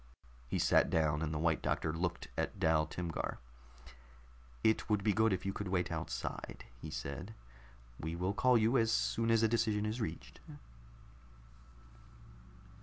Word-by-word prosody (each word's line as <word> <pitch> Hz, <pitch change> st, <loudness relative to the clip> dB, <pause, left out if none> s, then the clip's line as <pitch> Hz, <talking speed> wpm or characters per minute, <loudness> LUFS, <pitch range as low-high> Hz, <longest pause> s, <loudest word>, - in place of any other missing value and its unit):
He -, -, -1 dB
sat -, -, +4 dB
down, 75 Hz, -2 st, +2 dB
and 80 Hz, -2 st, -1 dB
the 75 Hz, -, -2 dB
White 80 Hz, 0 st, +1 dB
Doctor 80 Hz, -, -1 dB
looked 85 Hz, +1 st, -2 dB
at -, -, -2 dB
Dal 80 Hz, -3 st, +3 dB
Timgar. 85 Hz, 0 st, -3 dB, 1.3 s
"It 110 Hz, +1 st, +2 dB
would 105 Hz, -2 st, +2 dB
be 105 Hz, -, +3 dB
good 110 Hz, +2 st, +3 dB
if 95 Hz, 0 st, -1 dB
you 95 Hz, -, -1 dB
would 100 Hz, -, -3 dB
wait 90 Hz, -1 st, 0 dB
outside," -, -, -5 dB, 0.2 s
he 80 Hz, -, -6 dB
said. 80 Hz, +9 st, -5 dB, 0.6 s
"We 80 Hz, +2 st, -3 dB
will 90 Hz, +3 st, -1 dB
call 125 Hz, +3 st, +4 dB
you 115 Hz, +4 st, +3 dB
as 115 Hz, 0 st, +2 dB
soon 115 Hz, 0 st, +1 dB
as 115 Hz, -1 st, +4 dB
a -, -, +6 dB
decision 110 Hz, -2 st, +1 dB
is 110 Hz, +3 st, -2 dB
reached." 75 Hz, -, -5 dB
95 Hz, 155 wpm, -34 LUFS, 80-110 Hz, 1.3 s, a